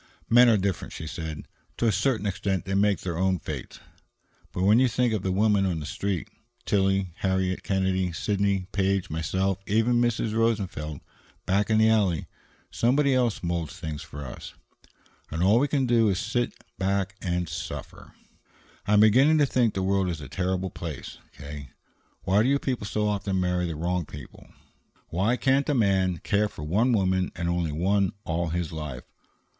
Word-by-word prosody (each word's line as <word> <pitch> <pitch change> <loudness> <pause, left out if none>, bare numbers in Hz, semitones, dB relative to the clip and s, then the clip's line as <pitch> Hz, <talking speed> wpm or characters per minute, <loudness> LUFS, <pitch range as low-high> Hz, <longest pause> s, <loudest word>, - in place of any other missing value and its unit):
"Men 120 +1 +7
are 110 - +5
different," 95 -2 -2
she 80 - -6
said. 80 -1 -6 0.3
"To - - 0
a 115 - +4
certain 105 +2 0
extent 100 -2 -1
they 95 - -3
make 100 -2 +2
their 85 -2 -3
own 95 0 +2
fates. 75 - -7 0.7
But 90 - -2
when 105 +4 +5
you 130 - +5
think 120 0 +1
of 105 - -1
the 95 - -1
women 105 +1 +3
on 85 -3 -1
the 75 - -6
Street, 100 +5 -3 0.4
Tillie, 95 -2 +1
Harriet 95 -1 0
Kennedy, 95 -2 0
Sidney 100 +2 0
Page, 95 -2 0
myself, 95 +4 -1
even 115 +3 +2
Mrs. 115 -2 0
Rosenfeld 95 -10 -1 0.4
back 100 +3 +1
in 110 - +3
the 110 0 +5
alley, 100 -8 +2 0.5
somebody 135 +4 +2
else 120 -6 +1
moulds 85 0 -3
things 80 -4 -5
for 75 0 -8
us, 65 - -9 0.7
and 80 +2 -2
all 105 +5 +5
we 145 - +2
can 140 -2 +1
do 115 -3 +3
is 95 - 0
to - - -5
sit 120 -2 0 0.3
back 95 0 0
and 90 -2 -1
suffer. 80 +2 -7 0.7
I 105 - +2
am 105 - +6
beginning 130 +9 +5
to 150 - +4
think 125 -5 +1
the 95 - -1
world 95 -1 +1
is 85 -3 -3
a 75 - -8
terrible 95 +3 -2
place, 80 -5 -7 0.2
K. 70 -1 -8 0.5
Why 95 +3 +3
do 135 +5 +3
people 125 -7 -3
so 105 0 0
often 100 -2 -1
marry 90 -1 0
the 80 - -4
wrong 85 +1 -2
people? 70 -3 -11 0.6
Why 100 +8 +1
can't 135 +2 +2
a 145 - +2
man 95 -6 +2
care 105 +5 +1
for 75 - -9
one 105 +11 +2
woman 95 -4 +1
and 85 -1 -3
only 85 -2 0
one 95 +4 +1
all 85 +1 -1
his 85 -1 -2
life? 75 -6 -6
95 Hz, 180 wpm, -26 LUFS, 85-110 Hz, 0.7 s, Men